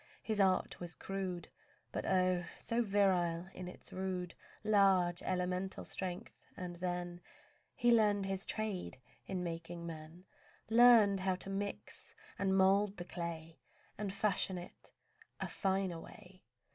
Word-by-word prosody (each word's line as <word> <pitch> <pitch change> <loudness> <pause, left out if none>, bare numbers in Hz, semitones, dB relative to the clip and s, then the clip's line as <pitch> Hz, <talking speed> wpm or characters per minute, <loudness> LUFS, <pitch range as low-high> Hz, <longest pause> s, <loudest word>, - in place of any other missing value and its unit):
His 215 -2 -1
art 190 -1 +2
was 175 -2 -5
crude, 190 -3 -4 0.4
But - - -3
oh! 185 -1 +2
so 230 +1 0
virile 190 -5 +2
in 180 - -6
its 180 - -11
rude, 185 -2 -3 0.3
Large, 195 -4 +4
elemental 185 +1 -2
strength; 180 -2 -6
and 175 -1 -5
then 175 0 -3 0.5
He 240 - +4
learned 210 -3 +4
His 195 0 -2
trade 215 -9 -3 0.3
in 185 -2 -2
making 170 0 -5
men, 165 +2 -8 0.5
Learned 225 -4 +7
how 185 0 +1
to 190 +2 -6
mix 200 +1 -5 0.2
and 195 -1 +2
mould 195 +2 +4
the 175 - -5
clay 165 -2 -6 0.4
And 205 -2 -3
fashion 195 -2 +1
in 175 - -7 0.7
a - - -2
finer 190 -3 0
way. 185 +2 -13
185 Hz, 135 wpm, -35 LUFS, 175-195 Hz, 0.7 s, Learned